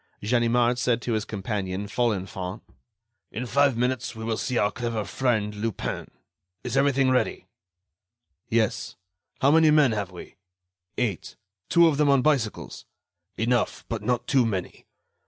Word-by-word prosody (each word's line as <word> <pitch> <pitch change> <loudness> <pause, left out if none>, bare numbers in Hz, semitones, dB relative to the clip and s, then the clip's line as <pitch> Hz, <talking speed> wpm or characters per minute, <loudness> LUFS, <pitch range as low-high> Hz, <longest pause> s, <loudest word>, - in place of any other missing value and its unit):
Ganimard 120 +2 +2
said 125 -1 +1
to 120 - -1
his 110 -1 -1
companion, 100 -2 -3
Folenfant: 100 -4 -2 0.7
"In 125 - -4
five 140 0 +2
minutes, 125 -1 -1
we 110 - -7
will 110 0 -1
see 125 +2 -2
our 105 -2 +2
clever 115 -4 -3
friend 110 -5 0
Lupin. 105 +1 -4 0.5
Is - - -3
everything 135 -1 +3
ready?" 130 - 0 1.0
"Yes." 110 -2 0 0.5
"How 140 - +5
many 160 0 +5
men 150 -4 +5
have 105 -3 -2
we?" 90 -2 -12 0.6
"Eight—two 100 - 0
of 150 -3 +1
them 150 -1 +3
on 140 -2 +4
bicycles." 135 -8 -1 0.5
"Enough, 120 0 0
but 115 -3 -3
not 120 +2 -1
too 135 -3 +3
many. 100 -6 -4
120 Hz, 135 wpm, -25 LUFS, 105-130 Hz, 1.0 s, How